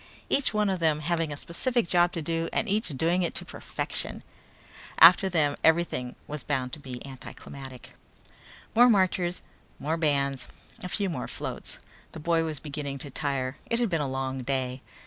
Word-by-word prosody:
Each 280 Hz, -, +2 dB
one 210 Hz, -1 st, +2 dB
of 190 Hz, -2 st, 0 dB
them 155 Hz, -2 st, +2 dB
having 165 Hz, 0 st, 0 dB
a 145 Hz, -, -4 dB
specific 235 Hz, -, 0 dB
job 175 Hz, 0 st, +4 dB
to 165 Hz, -, -3 dB
do 165 Hz, +1 st, -1 dB
and -, -, 0 dB
each 215 Hz, +3 st, +1 dB
doing 165 Hz, +4 st, +1 dB
it 175 Hz, -, -1 dB
to -, -, -2 dB
perfection. -, -, -3 dB, 0.7 s
After 180 Hz, +4 st, +8 dB
them 150 Hz, -5 st, +2 dB
everything 160 Hz, -7 st, +2 dB
was 150 Hz, -1 st, -5 dB
bound 130 Hz, -3 st, -2 dB
to -, -, -5 dB
be 130 Hz, -3 st, -8 dB
anticlimactic. 135 Hz, -1 st, -10 dB, 0.8 s
More 245 Hz, +3 st, +7 dB
marchers, 185 Hz, -4 st, +2 dB, 0.3 s
more 160 Hz, +3 st, -1 dB
bands, 140 Hz, -4 st, +1 dB, 0.3 s
a 180 Hz, -, -5 dB
few 200 Hz, +2 st, 0 dB
more 155 Hz, -9 st, -3 dB
floats. -, -, -5 dB, 0.4 s
The -, -, -7 dB
boy 165 Hz, +1 st, +2 dB
was 155 Hz, -3 st, -3 dB
beginning 140 Hz, -2 st, -4 dB
to 140 Hz, +1 st, -3 dB
tire. 135 Hz, -2 st, -2 dB
It 230 Hz, -, +2 dB
had 240 Hz, -3 st, +2 dB
been 165 Hz, -4 st, +1 dB
a 145 Hz, -, 0 dB
long 130 Hz, 0 st, -2 dB
day. 130 Hz, 0 st, -2 dB
155 Hz, 175 wpm, -28 LUFS, 140-175 Hz, 0.8 s, After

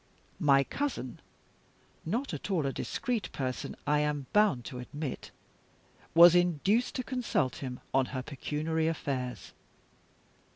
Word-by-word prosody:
My 140 Hz, -5 st, +5 dB
cousin 245 Hz, -, -3 dB, 0.9 s
(not 240 Hz, +10 st, -1 dB
at -, -, -5 dB
all 175 Hz, -7 st, +1 dB
a 135 Hz, -, -1 dB
discreet 240 Hz, -, -2 dB
person, 130 Hz, -2 st, -3 dB
I 150 Hz, 0 st, +3 dB
am 150 Hz, -2 st, -1 dB
bound 205 Hz, -, +3 dB
to 125 Hz, -, -6 dB
admit) 140 Hz, +2 st, -5 dB, 0.9 s
was 170 Hz, 0 st, +10 dB
induced 180 Hz, -, +2 dB
to 255 Hz, -, -1 dB
consult 240 Hz, -, -1 dB
him 125 Hz, -2 st, -5 dB
on 135 Hz, -1 st, +3 dB
her 130 Hz, -2 st, -4 dB
pecuniary 155 Hz, +3 st, -2 dB
affairs. 135 Hz, -6 st, -3 dB
150 Hz, 125 wpm, -30 LUFS, 135-190 Hz, 0.9 s, was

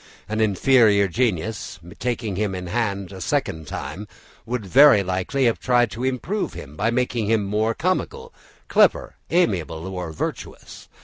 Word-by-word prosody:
An 110 Hz, +1 st, -2 dB
inferior 110 Hz, -1 st, +4 dB
genius, 105 Hz, -3 st, -2 dB, 0.2 s
taking 115 Hz, -5 st, -2 dB
him 100 Hz, -1 st, -1 dB
in 90 Hz, 0 st, -5 dB
hand 100 Hz, -2 st, -2 dB
a 95 Hz, -1 st, -9 dB
second 80 Hz, -2 st, -2 dB
time, 100 Hz, +7 st, -6 dB, 0.4 s
would 120 Hz, -3 st, -3 dB
very 130 Hz, 0 st, +6 dB
likely 95 Hz, +9 st, -1 dB
have 115 Hz, -, +1 dB
tried 120 Hz, -3 st, +2 dB
to 120 Hz, -, -6 dB
improve 130 Hz, -, -2 dB
him 70 Hz, +2 st, -10 dB
by 105 Hz, +8 st, 0 dB
making 120 Hz, -2 st, -1 dB
him 110 Hz, -1 st, +2 dB
more 105 Hz, +3 st, 0 dB
comical, 460 Hz, -, -2 dB, 0.3 s
clever, -, -, +2 dB
amiable, 85 Hz, -, 0 dB
or 90 Hz, -3 st, -5 dB
virtuous. 80 Hz, -, -7 dB
110 Hz, 145 wpm, -22 LUFS, 95-125 Hz, 0.4 s, very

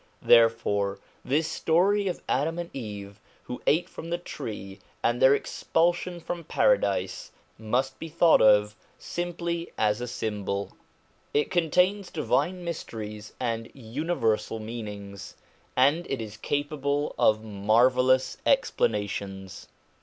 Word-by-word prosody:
Therefore 115 Hz, -4 st, +4 dB, 0.3 s
this 150 Hz, +5 st, +1 dB
story 190 Hz, +5 st, +2 dB
of 180 Hz, -, -3 dB
Adam 160 Hz, +5 st, 0 dB
and 170 Hz, 0 st, -5 dB
Eve 100 Hz, -5 st, -7 dB, 0.2 s
who 125 Hz, -, -7 dB
ate 160 Hz, +4 st, +3 dB
from 165 Hz, -, -9 dB
the 175 Hz, -, 0 dB
tree, 100 Hz, -, -7 dB, 0.2 s
and 120 Hz, +1 st, +1 dB
their 135 Hz, +1 st, +7 dB
expulsion 175 Hz, +4 st, 0 dB
from 170 Hz, 0 st, -5 dB
Paradise, -, -, +1 dB, 0.3 s
must 125 Hz, +5 st, -1 dB
be 165 Hz, -, -6 dB
thought 165 Hz, +1 st, +5 dB
of 105 Hz, 0 st, +5 dB, 0.2 s
simply 170 Hz, -1 st, -4 dB
as 105 Hz, +1 st, +1 dB
a 125 Hz, -, -3 dB
symbol. 105 Hz, -4 st, -3 dB, 0.6 s
It 145 Hz, -, +2 dB
contains 180 Hz, +3 st, +2 dB
divine 175 Hz, +3 st, 0 dB
mysteries 105 Hz, -10 st, -6 dB
and 115 Hz, -2 st, -2 dB
universal 115 Hz, -3 st, -1 dB
meanings, 105 Hz, -3 st, -7 dB, 0.4 s
and 145 Hz, +7 st, +3 dB
it 135 Hz, -, -2 dB
is 110 Hz, -2 st, -6 dB
capable 145 Hz, +3 st, -1 dB
of 110 Hz, 0 st, +3 dB
marvellous 125 Hz, +5 st, +3 dB
explanations. 100 Hz, -, -1 dB
130 Hz, 115 wpm, -27 LUFS, 105-165 Hz, 0.6 s, their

